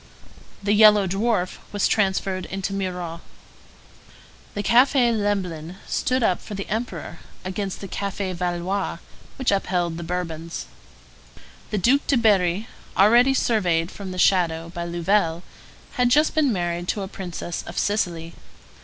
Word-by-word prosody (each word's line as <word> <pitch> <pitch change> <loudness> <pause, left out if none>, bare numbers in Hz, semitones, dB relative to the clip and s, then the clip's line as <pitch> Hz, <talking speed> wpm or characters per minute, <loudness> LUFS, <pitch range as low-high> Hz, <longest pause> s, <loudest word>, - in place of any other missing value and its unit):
The 205 +1 +2
Yellow 210 -1 +7
Dwarf 195 0 0
was 205 - +1
transferred 190 -3 0
into 195 +1 -3
Mirror. 180 -4 -3 1.4
The 205 - -2
Café 245 0 +4
Lemblin 185 -6 -2
stood 255 -1 0
up 185 -5 +2
for 210 - -7
the 195 - -5
Emperor, 225 +4 -4 0.3
against 190 +1 -4
the 195 - -6
Café 200 -1 -3
Valois, 180 +2 -2 0.4
which 260 -3 0
upheld 175 -4 0
the 170 - -5
Bourbons. 170 -1 -4 1.0
The 210 - -1
Duc 255 +9 +3
de 275 - +3
Berri, 205 -2 +2 0.3
already 240 +7 +6
surveyed 180 -9 +1
from 200 -2 -8
the 185 - -6
shadow 170 -3 +2
by 170 -1 -4
Louvel, 170 0 +1 0.5
had 250 -2 +2
just 300 +5 +4
been 300 -4 +3
married 175 -2 -2
to 200 - -1
a - - -4
princess 175 -3 -5
of - - -8
Sicily. 170 -5 -1
195 Hz, 135 wpm, -23 LUFS, 175-210 Hz, 1.4 s, Yellow